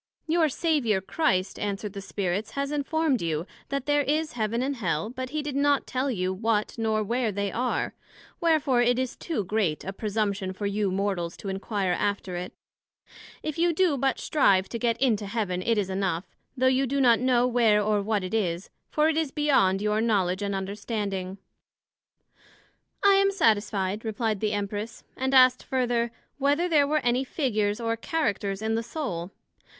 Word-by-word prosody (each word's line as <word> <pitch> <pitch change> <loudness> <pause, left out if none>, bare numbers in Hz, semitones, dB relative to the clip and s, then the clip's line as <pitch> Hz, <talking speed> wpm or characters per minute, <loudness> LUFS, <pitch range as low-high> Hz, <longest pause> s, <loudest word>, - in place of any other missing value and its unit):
Your 325 -1 +2
Saviour 270 - +1
Christ, 190 - 0
answered 205 0 -3
the 200 - -6
Spirits, 195 +1 -2
has 280 0 -2
informed 295 -1 0
you, 165 -1 -1 0.2
that 275 -2 -2
there 290 0 +3
is 305 +3 0
Heaven 230 +1 -1
and 275 0 -2
Hell, 170 -1 -1
but 255 0 -5
he 305 +2 -3
did 290 -2 -4
not 285 0 +2
tell 260 +2 -1
you 185 -6 -1
what, 215 +1 0
nor 220 -2 0
where 235 +1 0
they 200 0 -2
are; 250 +2 -1 0.5
wherefore 305 -7 +3
it 245 0 +3
is 260 -1 -2
too 315 - -3
great 190 -5 -1
a 195 - -5
presumption 200 -2 -2
for 205 +2 -5
you 200 0 0
Mortals 185 -3 -2
to 200 - -6
inquire 195 0 -1
after 200 -1 -1
it: 180 +1 -4 0.9
If 310 +1 -4
you 340 0 +3
do 345 -2 +2
but 270 0 0
strive 195 -11 +3
to 235 - -4
get 235 -1 0
into 220 -6 +1
Heaven, 195 -4 -2
it 230 +4 +1
is 200 -2 +1
enough, 190 -2 -1 0.3
though 260 - +1
you 260 +1 +3
do 280 +3 0
not 240 -4 +5
know 250 -1 +3
where 235 -4 +3
or 210 0 +1
what 205 -1 0
it 185 - -5
is; 180 -5 -1 0.2
for 305 0 +2
it 320 -1 +1
is 320 -3 +1
beyond 265 -10 +2
your 210 +1 +1
knowledg 195 -4 +1
and 200 -1 -1
understanding. 195 -1 -3 1.7
I 400 - +8
am 395 0 +4
satisfied, 210 - +1
replied 220 -1 -1
the 215 0 0
Empress; 205 +2 -4
and 265 +1 0
asked 255 -1 +6
further, 240 -3 0 0.3
Whether 290 +5 +2
there 300 -5 +4
were 305 +1 +1
any 245 +2 +2
Figures 215 -7 -1
or 230 -1 -1
Characters 215 - -2
in 220 0 0
the 225 - +1
Soul? 230 - -4
225 Hz, 180 wpm, -26 LUFS, 200-270 Hz, 1.7 s, I